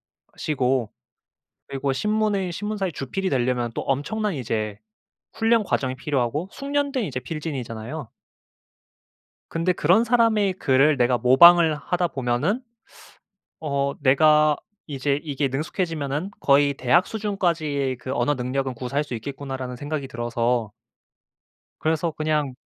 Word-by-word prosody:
것이고 130 -6 -2 0.8
그리고 135 0 -2
신문의 210 +2 0
신문사의 205 -2 -3
주필이 185 +8 -3
되려면 125 -2 0
또 - - -3
엄청난 185 +9 -1
이제 110 -5 -3 0.6
훈련 225 0 +2
과정이 130 -9 -1
필요하고 140 +4 -1
숙련된 280 -3 -1
이제 130 -7 -4
필진이잖아요. 130 -3 -6 1.4
근데 165 +2 +1
그런 180 +6 +3
사람의 225 -5 +3
글을 140 -2 +3
내가 125 0 +2
모방을 160 +6 +7
하다 175 +4 -1
보면은 135 - -1 1.0
어 140 -2 -1
'내가 150 +2 +5 0.3
이제 140 0 -1
이게 145 -2 -1
능숙해지면은 155 +3 -3
거의 140 0 +4
대학 150 +8 +3
수준까지의 165 - -1
그 130 +1 -5
언어 135 +5 +1
능력은 130 +1 -2
구사할 130 +5 -2
수 135 - -6
있겠구나.'라는 130 +1 -5
생각이 145 0 -4
들어서 120 -2 -1 1.1
그래서 160 +1 0
그냥 150 -3 -1
145 Hz, 300 characters per minute, -24 LUFS, 130-175 Hz, 1.4 s, 모방을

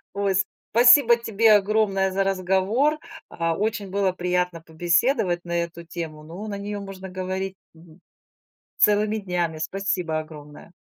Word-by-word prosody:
Ой. 200 -1 0 0.4
Спасибо 240 0 +7
тебе 225 -1 +2
огромное 195 -2 +1
за 195 +1 +1
разговор, 195 - +1 0.3
а, 165 -1 -2
очень 210 -2 -2
было 195 -2 +1
приятно 180 -1 -1
побеседовать 175 - 0
на 170 - -8
эту 170 0 -9
тему. 160 -3 -7
Ну, 175 +7 -8
на 200 -1 -4
неё 205 +1 -5
можно 190 -1 -8
говорить 185 +1 -4 0.2
мгм, 165 +1 -18 0.8
целыми 210 +1 +3
днями. 175 -5 -2
Спасибо 175 -2 -2
огромное! 150 0 -12
190 Hz, 135 wpm, -24 LUFS, 170-205 Hz, 0.8 s, Спасибо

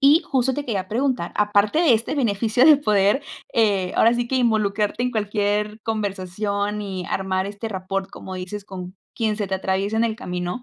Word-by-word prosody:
Y 290 +4 +6
justo 265 -1 +1
te 290 - -3
quería 200 -7 -2
preguntar, 255 +5 -1
aparte 210 +6 +2
de 325 -7 +5
este 225 +4 0
beneficio 230 -2 +2
de 305 0 +8
poder, 210 0 +2 0.3
eh, 200 -5 +2
ahora 230 +1 +5
sí 240 0 -2
que 265 - 0
involucrarte 215 -2 +1
en 250 - 0
cualquier 210 -1 -1
conversación 205 0 -2
y 190 -3 -5
armar 190 0 -1
este 205 +2 -6
rapport, 195 -1 -3
como 190 -1 -9
dices, 185 +2 -6
con 185 -2 -8 0.2
quien 220 -2 0
se 205 -3 -3
te 190 - 0
atraviesa 195 +3 -1
en 225 - +3
el 225 -1 0
camino, 180 0 -4
210 Hz, 185 wpm, -22 LUFS, 195-235 Hz, 0.3 s, de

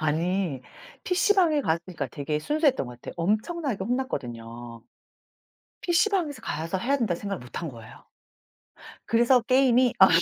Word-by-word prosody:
아니 165 -1 0 0.4
PC방에 360 -4 +3
갔으니까 170 - -2
되게 145 +4 -3
순수했던 290 - +1
것 125 - -8
같아요. - - -8
엄청나게 215 - -1
혼났거든요. 120 - -4 1.0
PC방에서 345 - +1
가서 165 +1 -2
해야 270 +9 +1
된다고 200 -9 -1
생각을 200 -2 -4
못 125 - -12
한 165 - -4
거예요. 115 -4 -13 1.0
그래서 240 +2 +4
게임이 255 0 +4
아 190 - +10
200 Hz, 330 characters per minute, -26 LUFS, -, 1.0 s, 아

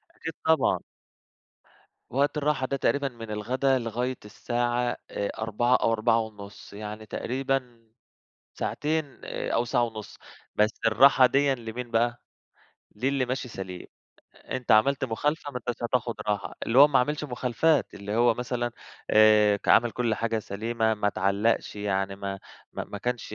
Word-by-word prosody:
أكيد 165 - -6
طبعًا. 160 0 +3 1.3
وقت 140 +4 +1
الراحة 145 -3 0
ده 140 - -2
تقريبًا 140 +1 +1
من 115 -4 -8
الغدا 130 +5 +1
لغاية 125 +2 -3
الساعة 120 +3 -1
آآ 100 - -2
16:00 115 +3 +1
أو 115 - +2
16:30 110 -3 -2
يعني 105 +1 -7
تقريبًا 125 -1 -3 0.7
ساعتين، 150 -2 -2
آآ - - -4
أو 115 - +2
ساعة 120 0 +1
ونُص، 110 -3 -5 0.4
بس 105 +1 +3 0.2
الراحة 130 +4 +6
ديًا 140 +2 +2
لمين 120 0 -7
بقى؟ 120 +1 0 0.7
لِلّي 130 +3 0
ماشي 125 0 -3
سليم، 95 -4 -7 0.5
أنت 130 -2 -6
عملت 135 +6 +4
مخالفة 145 +5 -2
ما 125 - -3
انتاش 120 0 -4
هتاخُد 120 0 0
راحة، 105 +1 -2
اللي 115 +3 +3
هو 145 +2 +9
ما 135 - +3
عملش 150 +4 0
مخالفات، 130 +3 +1
اللي 105 +2 -4
هو 120 -1 +4
مثلًا 120 0 -2 0.4
آآ 105 -1 +6
ك - - -10
عمل 120 0 +5
كلّ 115 -1 0
حاجة 115 0 -1
سليمة 110 +2 -1
ما 105 -1 0
اتعلّقش، 100 +4 0
يعني 95 -1 -1
ما 100 -1 -5 0.3
ما - - -4
ما 100 - -7
كانش 120 0 -3
120 Hz, 145 wpm, -27 LUFS, 110-130 Hz, 1.3 s, هو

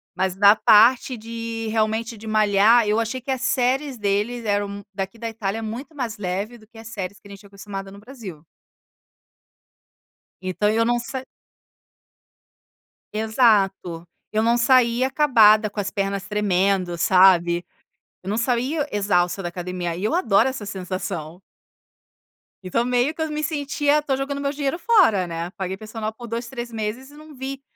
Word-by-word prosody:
Mas 185 0 -1
da 200 +2 +6
parte 235 +4 +5
de 225 +1 -12
ir, 230 -1 -4
realmente 220 +1 -1
de 220 +1 -11
malhar, 215 +2 +4
eu 215 +2 +2
achei 230 +3 -3
que 265 - -4
as 260 - -2
séries 260 +1 0
deles 210 +3 -1
eram 205 -1 -2
daqui 195 +3 -5
da 230 0 -4
Itália, 220 -1 -3
é - - -6
muito 240 +8 -6
mais 235 -6 -4
leve 200 +5 -4
do 215 -2 -20
que 230 - -19
as 225 0 -10
séries 200 -3 -6
que 205 - -17
a - - -13
gente 200 - -10
tinha 205 - -16
acostumada 195 -1 -8
no 200 - -12
Brasil. 210 - -10 2.0
Então 185 +3 0
eu 225 +1 +2
não 240 +1 +1
se 255 +2 -6 1.9
Exato, 210 -6 +1 0.3
eu 215 +1 +2
não 235 +1 +3
saía 245 0 +3
acabada, 225 -7 +5
com 205 - -7
as 205 0 -1
pernas 195 -1 -3
tremendo, 195 -3 0
sabe, 175 -1 +4 0.6
eu 190 - -6
não 215 - -1
saía 255 +6 0
exausta 195 -2 +1
da 175 - -2
academia, 175 -1 -4
e 185 - -6
eu 320 - +1
adoro 225 - +3
essa 260 -6 -4
sensação. 180 -3 -5 1.2
Então 185 +6 0
meio 250 +4 +1
que 320 - -7
eu 315 - -1
me 300 0 -3
sentia 290 0 +1
"Tô 280 -3 -1
jogando 280 +1 -3
meu 280 0 -1
dinheiro 285 +2 -2
fora" 335 - +4
né, 170 +1 -5
paguei 190 0 -5
personal 215 0 -5
por 240 +1 -10
2, 235 +1 -4
3 240 -1 -6
meses 225 +5 -5
e - - -17
não 305 0 -13
vi 265 +1 -6
220 Hz, 170 wpm, -22 LUFS, 195-250 Hz, 2.0 s, da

